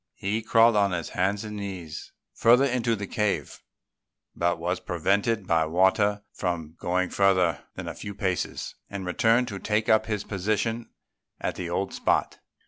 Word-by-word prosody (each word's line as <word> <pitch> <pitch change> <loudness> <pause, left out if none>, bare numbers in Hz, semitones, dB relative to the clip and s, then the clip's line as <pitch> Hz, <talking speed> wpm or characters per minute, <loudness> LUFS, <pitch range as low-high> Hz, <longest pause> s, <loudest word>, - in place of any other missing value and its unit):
He 105 +3 -2
crawled 115 +1 +5
on 100 -1 +4
his 85 -2 -3
hands 100 +3 0
and 105 -1 -6
knees 90 -6 -6 0.2
further 120 +3 +5
into 125 -3 +1
the 100 -1 -5
cave, 105 +1 -2 0.8
but 85 0 +1
was 90 +2 -2
prevented 100 +5 0
by 80 -2 +2
water 100 +4 +2
from 85 -4 -3
going 90 +1 0
further 90 -6 +2
than - - -6
a - - -4
few 100 - -7
paces, 95 -3 -2 0.2
and 100 -2 -5
returned 115 +7 +2
to 100 -2 -5
take 105 +2 0
up 110 0 +4
his 105 -2 -2
position 110 +4 -2 0.5
at - - -2
the 90 -2 -5
old 95 +3 -2
spot. - - 0
100 Hz, 160 wpm, -26 LUFS, 90-110 Hz, 0.8 s, crawled